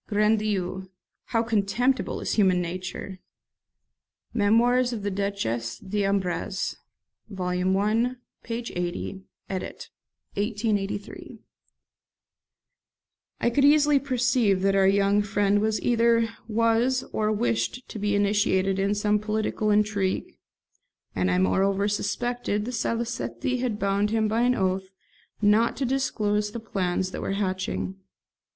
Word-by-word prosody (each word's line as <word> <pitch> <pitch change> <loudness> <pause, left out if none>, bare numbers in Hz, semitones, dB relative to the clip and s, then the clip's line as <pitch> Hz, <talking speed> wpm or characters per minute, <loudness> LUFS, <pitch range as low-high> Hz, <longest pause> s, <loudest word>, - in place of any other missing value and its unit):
Grand 210 +1 +3
Dieu! 190 -3 -2 0.4
how 230 -2 0
contemptible 230 +4 0
is - - -2
human 190 -4 +3
nature!'" 185 +2 -5 1.1
(Memoirs 240 +4 +3
of 220 -4 -4
the 205 - -1
Duchesse 155 - -2
d'Abrantes, 195 -1 -1 0.5
vol. 185 -1 0
i. 225 +5 +1 0.3
p. 230 - -6
80, 190 -4 -4 0.3
edit. 190 -1 -6 0.4
1883.)] 205 -1 -3 2.0
I - - +3
could 275 +4 +2
easily 295 0 +5
perceive 250 -7 +1
that 195 0 +3
our 195 -1 +4
young 200 +1 +3
friend 205 0 +1 0.2
either 230 -1 +3 0.2
was 230 +3 +2
or 215 0 +1
wished 120 - -1
to 215 - -7
be 205 0 0
initiated 200 -2 +2
in 200 +1 +1
some 210 0 +2
political 215 0 -1
intrigue; 205 -2 0 0.8
and 90 0 +1
I 90 - +2
moreover 195 - +2
suspected 210 +1 -1
that 245 - -4
Salicetti 230 - -2
had 240 -4 -1
bound 200 +1 +1
him 220 0 +1
by 220 +2 +1
an 250 +1 +3
oath 190 -1 -1 0.5
not 210 +3 +3
to 270 - -1
disclose 210 -5 0
the 235 - -4
plans 185 -4 -2
that - - -5
were - - -2
hatching. 185 - -2
205 Hz, 120 wpm, -26 LUFS, 190-230 Hz, 2.0 s, easily